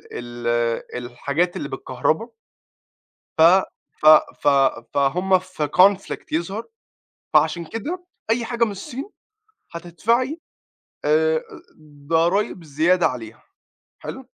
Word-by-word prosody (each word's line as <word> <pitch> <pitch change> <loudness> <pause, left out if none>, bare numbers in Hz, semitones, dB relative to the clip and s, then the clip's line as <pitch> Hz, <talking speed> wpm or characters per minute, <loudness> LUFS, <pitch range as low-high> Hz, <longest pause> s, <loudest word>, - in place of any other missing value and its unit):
ال 120 -1 -2 0.2
الحاجات 140 +8 -2
اللي 140 - -4
بالكهربا. 135 - -2 1.1
ف - - +2 0.6
ف - - -4 0.4
ف - - -1 0.5
فهُم 180 +7 +2
في 185 -5 -4
conflict 195 +5 +3
يظهر، 190 +7 -2 0.7
فعشان 170 -1 +3
كده 310 - -5 0.3
أي 230 +1 +1
حاجة 235 0 0
من 225 - 0
الصين 250 - -7 0.6
هتدفعي 230 - -1 0.7
آآ 160 +1 +2 0.7
ضرايب 170 +2 +1
زيادة 160 +5 +2
عليها 115 -3 -5 0.6
حلو؟ 265 0 -8
170 Hz, 95 wpm, -22 LUFS, 145-205 Hz, 1.1 s, conflict